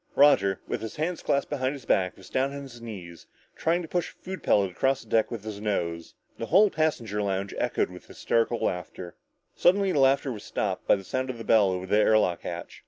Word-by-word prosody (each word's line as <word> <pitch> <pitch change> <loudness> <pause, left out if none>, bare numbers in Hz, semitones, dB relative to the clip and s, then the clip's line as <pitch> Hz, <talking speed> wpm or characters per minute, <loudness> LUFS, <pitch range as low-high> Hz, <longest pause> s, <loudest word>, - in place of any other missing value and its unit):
Roger, 100 -10 +5
with - - -3
his 110 - -6
hands 165 +3 -2
clasped 140 - 0
behind 130 -2 -1
his 135 -5 -10
back, 90 -4 +1
was 95 - -14
down 135 +1 +1
on 140 0 -6
his 120 -3 -11
knees 90 -8 -9 0.3
trying 170 +2 0
to - - -7
push 175 +1 -1
a - - -18
food 190 0 -7
pellet 100 -3 +2
across 135 +9 0
the 110 - -21
deck 110 -1 +3
with 115 -4 -6
his 105 -2 -7
nose. 85 -6 -2 0.2
The 115 - -4
whole 200 +4 +5
passenger 120 -10 -1
lounge 100 -1 -2
echoed - - 0
with - - -12
hysterical 115 +1 0
laughter. 90 0 -4 0.4
Suddenly 195 +1 +3
the 145 - +1
laughter 135 0 +3
was 105 -4 -7
stopped - - -3
by - - +6
the 95 - -7
sound 130 +7 -3
of 125 - -4
the 115 - -7
bell 110 -3 +4
over 90 0 -3
the 105 +3 +2
air 110 0 +5
lock 90 -5 +1
hatch. - - -7
115 Hz, 230 wpm, -27 LUFS, 100-140 Hz, 0.4 s, by